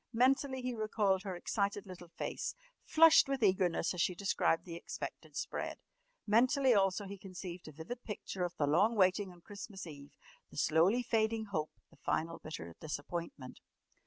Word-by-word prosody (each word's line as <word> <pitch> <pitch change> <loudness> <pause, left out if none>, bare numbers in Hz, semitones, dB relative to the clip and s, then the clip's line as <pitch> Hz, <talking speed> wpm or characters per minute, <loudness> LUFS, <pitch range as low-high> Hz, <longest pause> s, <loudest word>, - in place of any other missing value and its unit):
Mentally 260 +2 +2
he 250 0 -1
recalled 215 -4 +1
her 190 -2 -4
excited 200 +2 -1
little 180 -2 -10
face, - - -3 0.3
flushed 320 -1 +7
with 270 -3 0
eagerness 185 -4 +2
as 180 - -1
she 180 - +1
described 180 -3 +1
the 170 - -7
expected 170 - -7
spread. - - -3 0.5
Mentally 255 +4 +4
also 195 -1 +2
he 200 0 -8
conceived 185 -2 -8
a - - -7
vivid 165 - -7
picture 195 -3 -4
of 175 0 -2
the 145 - +2
long 190 +11 +3
waiting 190 0 +3
on 175 -1 -16
Christmas 200 0 -8
Eve, 145 -3 -10 0.4
the - - -13
slowly 170 +11 +3
fading 225 -1 +1
hope, 155 -4 -1 0.2
the - - -20
final 165 +1 -1
bitter 85 - -7
disappointment. 155 -2 -5
190 Hz, 160 wpm, -34 LUFS, 170-220 Hz, 0.5 s, flushed